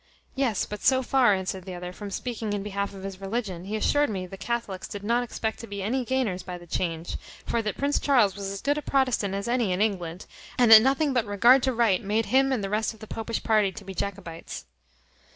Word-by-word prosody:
"Yes, 255 -7 0
but 210 - -7
so 260 -1 +3
far," 245 -5 +4
answered 190 -1 -4
the 185 -2 -6
other, 180 0 -6
"from 205 +2 -7
speaking 220 0 -3
in 200 -1 -2
behalf 200 0 -3
of 190 - -9
his 195 -1 -7
religion, 195 -4 -3
he 210 +2 -3
assured 290 +6 +2
me 190 -3 -3
the 185 - -9
Catholicks 200 -2 -3
did 200 -1 -7
not 235 +3 +1
expect 220 -2 -3
to 230 - -8
be 200 -1 -5
any 250 +6 0
gainers 235 -8 0
by 180 0 -7
the 175 - -13
change; 165 -1 -3 0.3
for 235 - 0
that 210 -2 -3
Prince 285 +1 +1
Charles 240 -9 +3
was 200 -1 -4
as 195 0 -5
good 290 +1 +1
a - - -6
Protestant 255 -9 +1
as 200 +3 -3
any 240 -5 +1
in 180 - 0
England; 185 -5 -1 0.3
and 245 -3 +5
that 220 -1 +12
nothing 275 +3 +2
but 240 -4 +1
regard 235 +6 +5
to 260 - +1
right 230 -6 +2
made 215 +3 0
him 270 +1 +3
and 245 -6 0
the - - -1
rest 220 +1 0
of - - -20
the 220 - -9
popish 225 +1 -4
party 215 -3 +3
to 195 +2 -11
be 190 - -7
Jacobites." 185 -4 -5
210 Hz, 240 wpm, -26 LUFS, 195-245 Hz, 0.3 s, that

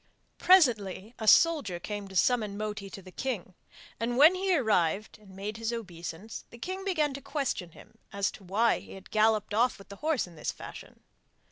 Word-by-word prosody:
Presently 230 - +4
a 220 - -4
soldier 260 - +5
came 205 +2 -5
to 190 - -12
summon 215 0 +2
Moti 210 -2 -4
to 195 - -10
the 185 - -12
king; 205 -6 -4 0.5
and, 240 +2 -1
when 305 +6 +8
he 370 -1 +1
arrived 210 - +1
and 195 -3 -16
made 205 +3 -5
his 225 0 -2
obeisance, 190 -2 -7
the 235 - -13
king 375 +9 -5
began 310 -7 +1
to 280 - -7
question 250 - -3
him - - -17
as 200 0 0
to 200 - -14
why 210 +6 +2
he - - -12
had 195 -1 -12
galloped 215 -1 +2
off 240 +4 +2
with 195 - -15
the 200 - -10
horse 310 -1 0
in 175 - -14
this 155 - -3
fashion. - - -11
215 Hz, 195 wpm, -29 LUFS, 195-260 Hz, 0.5 s, when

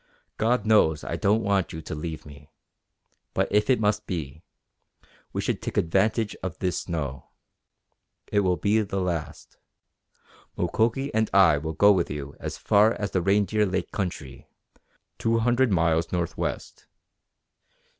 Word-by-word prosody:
God 115 0 +1
knows 80 -9 +3
I - - -3
don't 110 +3 +1
want 100 -3 +1
you 80 - -6
to - - -6
leave 80 +1 -6
me, 75 0 -14 0.9
but - - +1
if 105 +3 +2
it 130 - +4
must 105 -1 0
be 80 -4 -5 0.9
we - - -2
should - - -2
take - - -5
advantage 105 +6 +1
of 95 -2 -5
this 90 -2 -1
snow. 70 -6 -5 1.0
It 105 - +3
will 90 -3 +1
be 105 +2 +2
the 100 -2 -3
last. 85 -4 -4 1.0
Mukoki 115 - 0
and 110 0 +1
I 90 -7 +6
will 80 +2 -4
go 100 +6 +5
with 90 -4 +1
you 70 -1 -6
as - - -5
far 105 +2 +4
as 100 -2 -4
the 90 - 0
Reindeer 100 +3 +2
Lake 95 -1 -3
country, 80 -9 -5 0.7
two 115 0 +1
hundred 120 +1 +2
miles 85 -2 +1
northwest. 85 -2 -4
95 Hz, 145 wpm, -25 LUFS, 80-105 Hz, 1.0 s, I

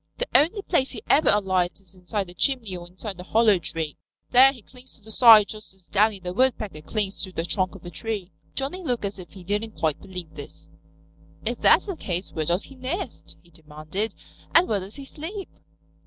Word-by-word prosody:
"The - - -1
only 375 +7 +3
place 275 -9 +1
he 230 - -5
ever 305 - +5
alights 185 -3 +1
is 190 -2 -14
inside 190 +2 -3
a 175 - -11
chimney 225 0 +1
or 175 -1 -8
inside 185 +1 -7
a - - -6
hollow 215 -1 +4
tree. 160 -2 -4 0.3
There 260 +2 +8
he 245 -6 -14
clings 250 +3 -13
to - - -19
the 220 - -9
side 220 -3 +8
just 215 -3 -9
as 190 -2 -26
Downy 210 +1 +2
the 180 -1 -5
Woodpecker 215 -8 0
clings 200 +3 -2
to 190 - -3
the 165 -2 -3
trunk 185 0 0
of - - -13
a 175 - -7
tree." 200 +1 -4 0.2
Johnny 280 +8 -3
looked 245 -8 -1
as 200 0 -4
if 175 - -10
he 190 -2 -13
didn't 210 +3 -3
quite 155 -3 0
believe 180 -4 -8
this. 145 -2 -11 0.7
"If - - -2
that's - - +5
the 390 -4 -4
case 180 - -4
where 155 - -2
does 175 +5 +1
he - - -12
nest?" 270 +9 -5
he 170 - -23
demanded. 155 +6 -5 0.4
"And 345 +2 +7
where 210 - +1
does 195 +2 -9
he 280 - -8
sleep?" 350 +8 -7
205 Hz, 215 wpm, -25 LUFS, 180-250 Hz, 0.7 s, There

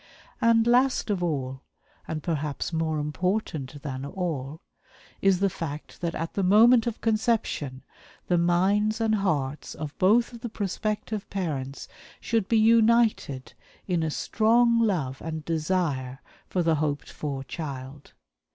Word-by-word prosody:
And, 230 -1 +4
last 250 -1 +3
of 195 -3 -1
all 135 -6 -2 0.5
and 155 -2 -4
perhaps 150 -1 -2
more 160 -1 0
important 150 -2 -2
than 135 -3 -4
all 155 -3 -4 0.6
is 195 -1 +3
the 200 - +4
fact 155 -5 -7
that 170 -1 -2
at 165 0 -4
the 200 - -1
moment 225 +5 +6
of 235 - -3
conception 215 - 0 0.4
the 175 -1 +2
minds 195 +6 +2
and 225 -1 +1
hearts 155 -9 -1
of 150 -1 -6
both 230 +6 +4
of 235 - -10
the 240 - -4
prospective 215 0 -3
parents 145 -8 -4 0.3
should 225 -4 0
be 230 - +3
united 225 - +3 0.3
in 175 -3 0
a 160 - 0
strong 230 +7 +3
love 165 - 0
and 160 -1 -5
desire 155 -6 -1 0.3
for 180 - 0
the 165 -2 +2
hoped 145 -2 -2
for 140 -3 -4
child. 140 -2 -7
175 Hz, 140 wpm, -26 LUFS, 145-215 Hz, 0.6 s, moment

